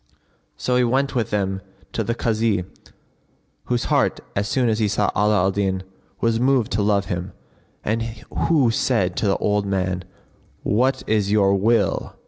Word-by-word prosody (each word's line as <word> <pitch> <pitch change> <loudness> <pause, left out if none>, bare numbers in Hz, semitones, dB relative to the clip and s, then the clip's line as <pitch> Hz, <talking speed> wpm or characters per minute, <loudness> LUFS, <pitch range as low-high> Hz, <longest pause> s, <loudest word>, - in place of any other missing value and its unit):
So 125 0 0
he 125 - +4
went 135 +3 +1
with 120 -5 0
them 95 -2 -1 0.3
to - - -1
the 115 - -2
Kazi 110 -5 0 1.0
whose 120 -1 0
heart, - - +1 0.2
as 100 +1 0
soon 130 +1 +1
as 110 -1 +1
he 110 - +2
saw 105 - +1
Ala 105 0 +3
al 95 - +2
Din, 95 -1 -1 0.4
was 115 -1 +1
moved 130 -2 +2
to 105 - +1
love 100 -1 +2
him, 90 -1 -4 0.5
and 110 +2 0
who 115 +4 0
said 100 -7 +1
to 105 - +1
the 95 - +2
old 105 -1 0
man, 95 -2 -1 0.6
"What 125 +6 +1
is 105 -2 +1
your 100 -2 +4
will?" 100 0 +1
105 Hz, 165 wpm, -22 LUFS, 100-115 Hz, 1.0 s, he